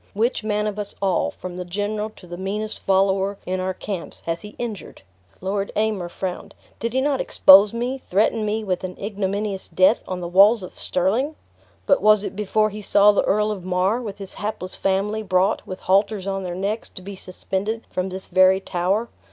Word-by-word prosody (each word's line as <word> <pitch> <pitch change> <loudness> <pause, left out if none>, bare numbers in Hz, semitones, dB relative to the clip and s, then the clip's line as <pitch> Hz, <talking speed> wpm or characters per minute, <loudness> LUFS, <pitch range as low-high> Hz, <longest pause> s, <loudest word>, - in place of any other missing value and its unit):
Which 225 +2 0
man 210 -1 0
of 210 -1 -3
us 205 -1 -5
all, 195 -3 +1
from 180 -1 -8
the 180 - -3
general 205 +4 -3
to - - -14
the 175 0 -7
meanest 205 +4 -4
follower 195 +1 +1
in 185 +1 -2
our 185 0 -2
camps, 190 -3 -6
has 165 0 -2
he 210 0 -11
injured?" 220 - -6 0.4
Lord 195 +1 -2
Aymer 210 -5 0
frowned. 180 +1 -5 0.2
"Did 230 +1 -3
he 260 - +2
not 280 -1 +1
expose 200 +2 +7
me, 245 +3 -3
threaten 215 +3 +2
me 215 +1 -1
with 185 -3 -2
an 185 -1 -5
ignominious 200 -1 -3
death, 185 +5 +3
on 185 -1 -3
the 175 - -4
walls 200 +4 +5
of 180 - -9
Stirling?" 225 - 0 0.5
"But 280 - +3
was 215 -1 +5
it 205 - -5
before 215 +1 +1
he 210 +1 -7
saw 205 0 +5
the 205 - +1
Earl 210 +1 +2
of 195 -4 -5
Mar, 185 +6 +1
with 210 -4 -6
his 195 -2 -8
hapless 205 -3 -5
family, 200 +3 0
brought, 190 0 +1
with 185 - -7
halters 200 +1 +2
on 195 0 -2
their 180 -2 -4
necks, 200 +4 -3
to 185 - -11
be 200 +1 -7
suspended 195 +4 -4
from 185 +1 -2
this 190 +1 -7
very 185 0 +4
tower? 195 +5 -1
200 Hz, 200 wpm, -22 LUFS, 185-215 Hz, 0.5 s, expose